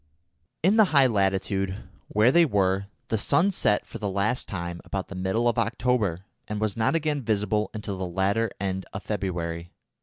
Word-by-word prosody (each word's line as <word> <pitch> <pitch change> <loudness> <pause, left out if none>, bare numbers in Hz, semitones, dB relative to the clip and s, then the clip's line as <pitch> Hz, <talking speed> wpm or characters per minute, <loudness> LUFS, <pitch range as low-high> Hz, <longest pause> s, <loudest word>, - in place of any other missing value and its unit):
In 195 +6 +4
the 220 - +7
high 135 - +7
latitude 95 -3 0 0.2
where 110 +4 +4
they 170 +4 +6
were 100 - +1 0.2
the 110 - 0
sun 180 - +3
set 105 - +1
for - - -9
the 105 - -2
last 100 +6 0
time 85 -2 -5
about 95 -1 -4
the - - -7
middle 95 +6 0
of 120 0 +2
October, 110 -5 0 0.2
and 105 -1 -3
was 110 -2 -1
not 110 +8 +1
again 150 -3 0
visible 105 -2 0
until 105 -3 -5
the 95 - -2
latter 100 +5 +1
end 95 -1 -3
of 95 - -6
February. 85 -4 -3
105 Hz, 180 wpm, -26 LUFS, 95-115 Hz, 0.2 s, the